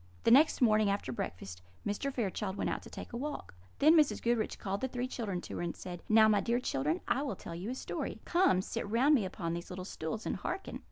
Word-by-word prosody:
The - - +4
next 290 +5 +6
morning, 215 -2 +4
after 200 -9 -1
breakfast, 90 -5 -5 0.2
Mr. 210 +7 -1
Fairchild 205 -5 -2
went - - -1
out - - -3
to - - -12
take - - -9
a - - -2
walk. 290 - -5 0.2
Then 310 +3 +6
Mrs. 305 -3 +4
Goodriche 235 -2 0
called 195 -1 -3
the 260 - 0
three 250 0 -3
children 205 -8 -3
to - - -7
her, - - -3
and 170 -1 -3
said: 175 -2 -7
"Now, 220 0 +7
my 210 -1 +4
dear 235 +4 +1
children, 150 - -1
I 270 - +1
will 275 -8 -2
tell 170 - -8
you 180 +6 -5
a 255 - -3
story. - - -4
Come, 340 - +3
sit 225 -1 -4
round 255 +7 +4
me 235 -9 +3
upon 170 -3 -3
these 170 +1 -5
little 180 0 -6
stools, 185 +4 -5
and - - -1
hearken." 370 - -4
215 Hz, 240 wpm, -32 LUFS, 180-255 Hz, 0.2 s, Now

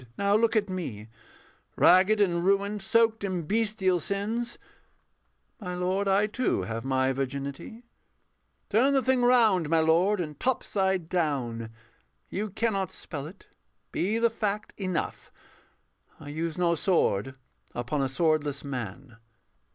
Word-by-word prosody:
Now 200 0 +2
look 230 +1 +2
at 210 -2 +2
me, 125 - -5 0.7
Ragged 190 +4 +5
and 175 -4 +2
ruined, 200 +2 +1
soaked 225 +2 +2
in 185 -3 -2
bestial 205 -1 +1
sins: 215 +7 -3 1.0
My 180 -5 -5
lord, 185 +3 -1
I 195 +2 +3
too 235 +4 -1
have 115 0 -4
my 130 0 +1
virginity 140 - -5 0.9
Turn 255 +7 +4
the 270 -1 +2
thing 260 -1 +2
round, 225 -10 +4
my 165 0 +3
lord, 170 +6 +3
and 150 -4 -5
topside 190 -8 0
down, 135 -10 -1 0.6
You 210 +3 -3
cannot 200 -2 -1
spell 145 -3 -7
it. 190 +5 -14 0.5
Be 205 +5 0
the 230 0 +2
fact 210 -2 -3
enough, 185 -4 -4 0.9
I 145 - -9
use 160 +2 -3
no 175 -1 +2
sword 135 - +1 0.4
upon 125 +4 -2
a 135 - 0
swordless 150 -1 0
man. 125 -2 -6
185 Hz, 130 wpm, -27 LUFS, 145-210 Hz, 1.0 s, Ragged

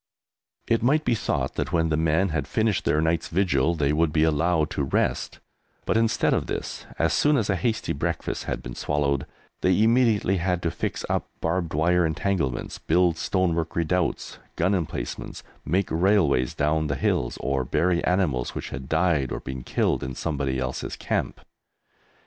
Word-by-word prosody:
It 115 - +2
might 150 +6 +2
be 120 - +2
thought 115 - -1
that - - -2
when 80 -1 +2
the 80 - +1
men 80 +4 +2
had 80 -3 -2
finished 110 -3 0
their 75 - +2
night's 80 +1 0
vigil 85 -4 +1
they 75 -2 +1
would 80 0 +2
be 80 0 +2
allowed 80 0 +2
to 70 - -1
rest, 65 - -1 0.5
but - - 0
instead 115 0 +2
of - - 0
this, - - -5
as 80 - +2
soon 150 0 +3
as 105 -4 +1
a - - +1
hasty 115 +3 -1
breakfast - - -3
had - - -3
been - - -7
swallowed, 70 -1 -1 0.3
they 95 +3 +3
immediately 115 -5 +3
had 90 0 -1
to 85 - 0
fix - - -3
up - - -1
barbed 80 -1 -1
wire 90 +3 +3
entanglements, 80 -5 -1
build 85 0 +2
stonework 85 -2 0
redoubts, 85 +1 -1 0.2
gun 90 +4 +1
emplacements, 80 -9 -4 0.2
make 95 +4 0
railways 80 -7 +2
down 75 +1 +1
the 70 - -1
hills, 60 -2 0
or 70 0 0
bury 85 +7 +1
animals 80 -10 0
which - - -5
had 65 +1 -7
died 80 -5 +1
or - - -3
been 65 -1 -6
killed - - 0
in 65 +1 -5
somebody 70 -4 -2
else's 65 0 -3
camp. - - -2
80 Hz, 170 wpm, -25 LUFS, 75-95 Hz, 0.5 s, soon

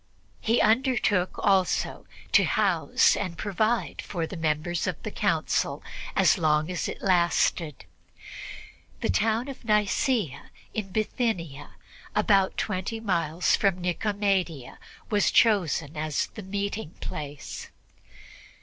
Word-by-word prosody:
He 230 +2 +2
undertook 220 -5 +2
also 190 -2 +1 0.2
to - - +6
house - - +3
and 185 -4 -4
provide 215 +3 0
for 170 -5 -3
the 185 - -7
members 160 +1 -1
of - - -1
the - - -4
Council - - 0 0.3
as - - +4
long 155 +1 +2
as 180 - -2
it - - -7
lasted. 175 -4 +1 1.2
The - - +1
town 225 - +1
of 275 -2 -8
Nicea 210 - +1 0.2
in 210 -3 -3
Bithynia, 185 - -2 0.4
about 195 -3 +3
twenty 210 +2 -2
miles 175 -5 +1
from 195 -3 +1
Nicomedia, 180 - -1 0.3
was 205 -2 +3
chosen 170 - +2
as 155 -1 -1
the 215 - -7
meeting 200 -1 -4
place. 145 -2 -6
190 Hz, 115 wpm, -27 LUFS, 165-215 Hz, 1.2 s, to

